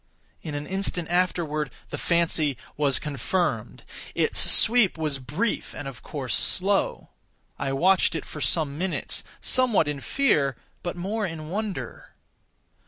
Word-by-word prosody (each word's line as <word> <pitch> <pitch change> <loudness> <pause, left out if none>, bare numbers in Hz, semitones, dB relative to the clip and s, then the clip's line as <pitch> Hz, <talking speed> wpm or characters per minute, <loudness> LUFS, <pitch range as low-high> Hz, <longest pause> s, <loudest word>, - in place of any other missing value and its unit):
In 150 -2 -5
an 145 0 -4
instant 185 -2 -1
afterward 165 -5 0 0.2
the 145 - -3
fancy 160 -5 +1 0.2
was 140 -2 +3
confirmed. 140 - -2 0.3
Its - - +2
sweep 225 -6 +5
was 155 -4 -1
brief, 150 - -2
and 145 - -6
of 125 -5 -8
course 130 -7 -4
slow. 195 +2 +2 0.5
I 135 - -1
watched 175 +5 +3
it 160 - -3
for 150 - -8
some 150 -3 0
minutes, 185 0 -1 0.2
somewhat 245 -11 +3
in 145 -1 -2
fear, 150 - +2 0.3
but 175 - -4
more 200 +4 -2
in 155 -2 -7
wonder. 210 +2 -5
160 Hz, 135 wpm, -26 LUFS, 145-190 Hz, 0.5 s, sweep